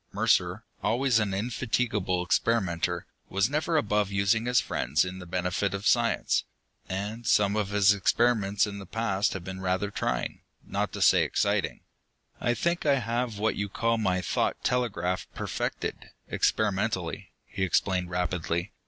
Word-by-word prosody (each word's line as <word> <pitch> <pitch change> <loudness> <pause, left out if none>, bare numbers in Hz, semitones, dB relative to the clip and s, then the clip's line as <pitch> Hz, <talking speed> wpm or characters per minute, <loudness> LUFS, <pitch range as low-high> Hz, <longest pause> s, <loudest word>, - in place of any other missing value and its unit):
Mercer, - - +1 0.2
always 125 0 +2
an 105 -2 0
indefatigable 105 -3 -1
experimenter, 95 -4 0 0.2
was 100 +6 +1
never 155 +2 +1
above 105 -6 +1
using 100 +4 +1
his 125 -1 +4
friends 75 +6 0
in 90 +1 -6
the 90 - -9
benefit 90 +2 -1
of 100 +1 -6
science. 120 0 +2 0.5
And 105 +5 -4
some 100 -2 +3
of 105 -2 0
his 100 0 +5
experiments 105 0 +2
in 100 -1 -6
the 95 - -9
past 105 -2 0
had 95 - -5
been 95 +1 -6
rather 95 +2 -1
trying, - - -2 0.2
not - - -2
to - - 0
say - - +6
exciting. - - 0 0.6
"I 120 - +1
think 170 +4 0
I 145 -2 +4
have 120 -2 -2
what 110 +2 0
you 100 0 -2
call 115 +3 0
my 95 -4 +1
thought 85 - -1
telegraph 95 -7 0
perfected, - - -3 0.2
experimentally," - - 0 0.2
he 100 - -7
explained 95 0 +1
rapidly. 90 +1 -2
100 Hz, 150 wpm, -28 LUFS, 95-115 Hz, 0.6 s, say